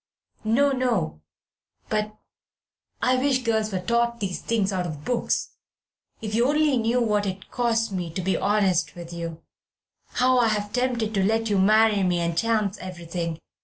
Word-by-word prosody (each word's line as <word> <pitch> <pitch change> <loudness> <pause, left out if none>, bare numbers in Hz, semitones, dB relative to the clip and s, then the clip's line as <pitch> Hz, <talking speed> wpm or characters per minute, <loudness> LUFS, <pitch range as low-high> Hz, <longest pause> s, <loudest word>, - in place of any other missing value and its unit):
"No, 260 +6 +3
no; 235 - -1 0.7
but... 215 0 -2 0.9
I 255 0 +3
wish 260 -1 +1
girls 220 -2 0
were 185 - -1
taught 235 +4 0
these 195 -4 -3
things 210 -4 0
out 180 -1 -1
of 150 -3 -7
books. 245 -1 0 0.7
If 215 -1 -4
you 235 +3 +3
only 300 -1 +3
knew 235 +2 +1
what 210 -3 +1
it 190 0 -6
costs 230 -3 0
me 180 -3 -3
to 185 - -2
be 190 +1 +1
honest 195 -5 +1
with 170 -1 -9
you, 165 -1 -6 0.7
how 255 0 +3
I 235 - +4
have 210 -1 -1
been 250 +1 +2
tempted 225 -3 -2
to 195 -2 +1
let 225 +2 +1
you 200 - +3
marry 215 +1 +4
me 180 -2 +1
and 170 -1 -1
chance 215 0 0
everything! 170 -2 -5
215 Hz, 170 wpm, -25 LUFS, 185-235 Hz, 0.9 s, I